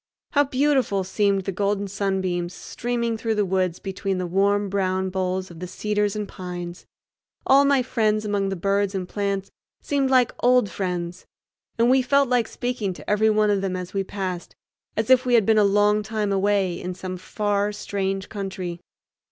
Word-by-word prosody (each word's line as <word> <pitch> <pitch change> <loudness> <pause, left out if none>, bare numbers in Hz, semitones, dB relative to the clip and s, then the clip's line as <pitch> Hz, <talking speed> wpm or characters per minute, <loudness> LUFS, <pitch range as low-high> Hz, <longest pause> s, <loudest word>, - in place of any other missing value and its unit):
How 290 0 +4
beautiful 265 -7 +1
seemed 195 0 +1
the 195 - -2
golden 200 +1 -1
sunbeams 190 -3 -2
streaming 235 -1 -2
through 225 0 -1
the 210 -1 +2
woods 185 -2 0
between 195 -1 -3
the 185 - -2
warm 200 +3 +2
brown 190 -1 0
boles 185 0 -2
of 165 - -11
the 180 - -5
cedars 210 +1 -1
and 210 -1 -3
pines! 175 -2 -7 0.6
All 275 +1 +6
my 280 -2 +3
friends 215 -3 +1
among 200 -2 0
the 195 - -2
birds 200 +2 0
and 185 -2 -3
plants 200 0 -2 0.3
seemed 275 -2 +1
like 255 -2 +4
old 245 -5 +3
friends, 180 -2 -4 0.5
and 230 +1 +4
we 260 +1 +5
felt 280 +1 +3
like 245 -3 +2
speaking 245 -6 -3
to - - -13
every 210 +1 +3
one 215 -1 +3
of 200 -1 +1
them 190 -1 -2
as 180 -1 -6
we 195 -1 0
passed, 185 -3 -5 0.4
as 220 +3 +1
if 255 0 +6
we 250 -2 +3
had 225 -4 +4
been 220 0 +4
a - - +5
long 205 +1 +3
time 210 -1 -2
away 195 -2 +1
in 180 0 -4
some 185 0 -5
far, 205 +2 -1
strange 195 -2 -3
country. 190 -4 -5
200 Hz, 185 wpm, -24 LUFS, 190-220 Hz, 0.6 s, All